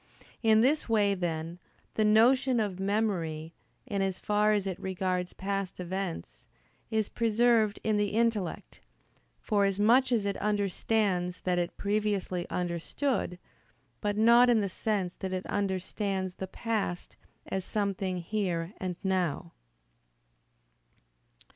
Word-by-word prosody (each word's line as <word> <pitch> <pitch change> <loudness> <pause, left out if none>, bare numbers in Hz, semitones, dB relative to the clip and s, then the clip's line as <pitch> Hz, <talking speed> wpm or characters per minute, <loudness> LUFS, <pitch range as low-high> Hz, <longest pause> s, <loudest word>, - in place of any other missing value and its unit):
In 220 -1 +5
this 280 +2 +2
way, 205 -3 +3
then, 170 -2 -3 0.3
the 215 - +1
notion 240 +4 +4
of 200 -4 -2
memory, 180 -6 -1 0.3
in 200 -1 -2
as 190 -1 -1
far 210 0 +2
as 205 -2 +1
it 190 -2 -3
regards 185 -1 -2
past 195 -1 -3
events, 175 - -5 0.4
is 220 -2 0
preserved 230 -2 +2
in 215 -1 +1
the 205 0 +2
intellect, 220 -4 -1 0.6
forasmuch 210 +5 +3
as 225 -4 +2
it 200 - -1
understands 200 -3 0
that 180 -1 +1
it 175 0 -3
previously 200 -4 -1
understood: 180 - -2 0.6
but 205 -1 -1
not 235 +3 +6
in 235 -2 +5
the 200 - -1
sense 190 -2 -1
that 190 -1 -4
it 185 0 -3
understands 190 -1 -2
the 190 - -6
past 205 -3 -3 0.3
as 190 -1 -3
something 195 -3 -1
"here" 180 -3 -2
and 185 -2 -3
"now." 180 -4 -1
200 Hz, 125 wpm, -29 LUFS, 180-215 Hz, 0.6 s, not